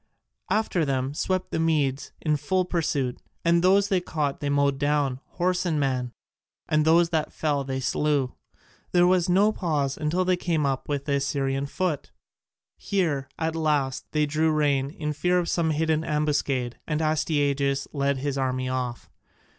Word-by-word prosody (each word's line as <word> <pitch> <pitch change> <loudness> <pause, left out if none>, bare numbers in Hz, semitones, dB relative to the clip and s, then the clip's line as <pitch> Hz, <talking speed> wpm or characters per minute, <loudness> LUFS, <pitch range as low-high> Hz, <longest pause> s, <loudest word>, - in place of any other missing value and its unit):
After 210 -6 +1
them 135 -1 -1
swept 185 +4 -1
the - - -1
Medes 145 -4 0
in 155 -2 +1
full 180 +6 0
pursuit, 145 -8 -1 0.3
and 170 0 +4
those 195 +2 +4
they 190 -3 +2
caught 150 -5 -2
they 145 - -2
mowed 140 -1 +2
down, 145 -3 +1
horse 180 +1 0
and 165 -4 0
man, 130 -3 -1 0.6
and 155 0 +2
those 165 +1 +5
that 160 -3 -1
fell 145 -3 -1
they 130 0 -3
slew. 140 -1 0 0.6
There 175 0 +5
was 180 0 +3
no 200 +4 +4
pause 150 -9 -1
until 160 +4 0
they 180 0 +2
came 165 -4 0
up 135 0 -2
with 140 -1 -2
the 140 -2 +1
Assyrian 135 0 -1
foot. 160 0 -2 0.7
Here 160 -9 -1
at 160 0 -1
last 145 -5 0
they 150 -1 +2
drew 155 +2 +1
rein 145 -3 +1
in 150 0 -4
fear 180 +5 +1
of 175 -1 0
some 170 -2 +1
hidden 160 0 +1
ambuscade, 145 -5 -1
and 150 -1 -1
Astyages 145 -3 +1
led 140 -1 0
his 140 0 -2
army 130 -1 -1
off. 125 -2 -3
150 Hz, 165 wpm, -26 LUFS, 140-165 Hz, 0.7 s, those